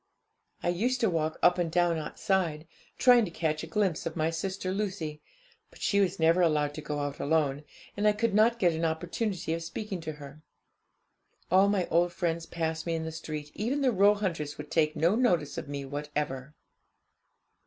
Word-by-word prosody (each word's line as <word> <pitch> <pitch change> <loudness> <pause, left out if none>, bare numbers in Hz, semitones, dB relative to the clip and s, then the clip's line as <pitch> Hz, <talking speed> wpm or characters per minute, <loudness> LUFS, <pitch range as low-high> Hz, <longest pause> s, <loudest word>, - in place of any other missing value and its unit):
I 175 - +1
used 240 +9 0
to 225 -5 +3
walk 160 -1 -1
up 175 0 +5
and 170 -2 0
down 175 -1 +2
outside, 160 0 -1 0.3
trying 245 -2 +6
to - - -5
catch 160 -2 -1
a 165 - -6
glimpse 190 -3 0
of 160 - -5
my 160 0 0
sister 185 +2 -3
Lucy; 185 -7 -3 0.5
but - - -18
she 200 - +1
was 195 -1 +1
never 165 +2 +4
allowed 150 -3 +2
to 155 - -6
go 150 -1 -3
out 145 0 -4
alone, 145 -2 +1 0.3
and 205 +1 +1
I 210 - +5
could 220 0 0
not 225 +3 +4
get 175 -6 +3
an 160 +1 -3
opportunity 170 +2 -2
of 165 - -3
speaking 190 +3 -5
to 155 -1 -5
her. 145 0 -12 1.1
All 190 +2 +5
my 195 -3 +1
old 175 +2 +3
friends 170 -1 -2
passed 160 0 -3
me 165 - 0
in 160 - -2
the 160 - -4
street 155 -2 -6
even 255 +7 -1
the 260 -2 +3
Roehunters 190 -8 +2
would 150 0 -9
take 155 -2 +2
no 170 +4 +3
notice 180 - +1
of - - -8
me 140 -1 -4
whatever. 145 -1 -4
165 Hz, 190 wpm, -29 LUFS, 155-195 Hz, 1.1 s, trying